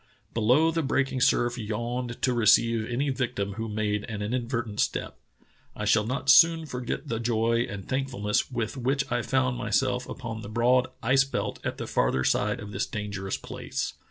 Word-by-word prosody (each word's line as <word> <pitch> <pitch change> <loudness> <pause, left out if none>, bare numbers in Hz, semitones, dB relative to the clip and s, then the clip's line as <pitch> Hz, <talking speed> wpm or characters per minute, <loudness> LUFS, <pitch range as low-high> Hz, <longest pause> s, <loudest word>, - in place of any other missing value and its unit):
Below 125 +9 +3
the 165 0 0
breaking 135 -2 0
surf 120 0 +2
yawned 120 +3 -3
to 130 - +3
receive 115 -1 +3
any 135 +4 0
victim 115 -6 -2
who 110 +1 -4
made 105 -1 -1
an 105 -3 -5
inadvertent 115 -1 -2
step. - - -1 0.6
I 105 - -4
shall 105 0 +3
not 130 +2 -3
soon 165 +3 +6
forget 125 -4 -4
the 115 - -2
joy 115 0 +1
and 100 -2 -7
thankfulness 130 -6 -1
with 120 0 -3
which 135 +3 +1
I 120 0 +1
found 130 -1 0
myself 125 +4 0
upon 115 -4 -6
the 100 - -8
broad 125 +3 +3 0.2
ice 135 +3 +4
belt 135 - -3
at - - -3
the - - -4
farther 65 +1 +1
side - - +1
of 105 - -8
this 100 0 -2
dangerous 100 -2 -4
place. - - -5
120 Hz, 175 wpm, -27 LUFS, 110-130 Hz, 0.6 s, soon